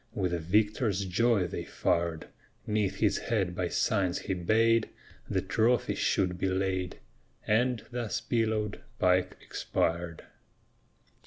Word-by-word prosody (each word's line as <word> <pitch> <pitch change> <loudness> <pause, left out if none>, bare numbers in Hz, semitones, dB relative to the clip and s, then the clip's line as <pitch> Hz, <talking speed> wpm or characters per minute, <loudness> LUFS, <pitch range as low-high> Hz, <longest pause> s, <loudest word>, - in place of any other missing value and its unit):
With 90 -5 0
a 85 - 0
victor's 105 +3 +1
joy 105 +1 +2
they 90 - -4
fired, 85 -2 -1 0.4
'Neath 105 -2 0
his - - +2
head 100 -6 -1
by 90 0 -1
signs 95 0 +1
he 95 - -3
bade 110 +5 +3 0.4
The 95 - 0
trophy 110 +5 +2
should 90 -2 0
be 95 - +1
laid; 95 -1 -1 0.5
And, 120 +2 +1
thus 120 -3 -2
pillowed, 110 -3 -1 0.2
Pike 90 0 +2
expired. 85 0 -2
95 Hz, 120 wpm, -29 LUFS, 90-110 Hz, 0.5 s, bade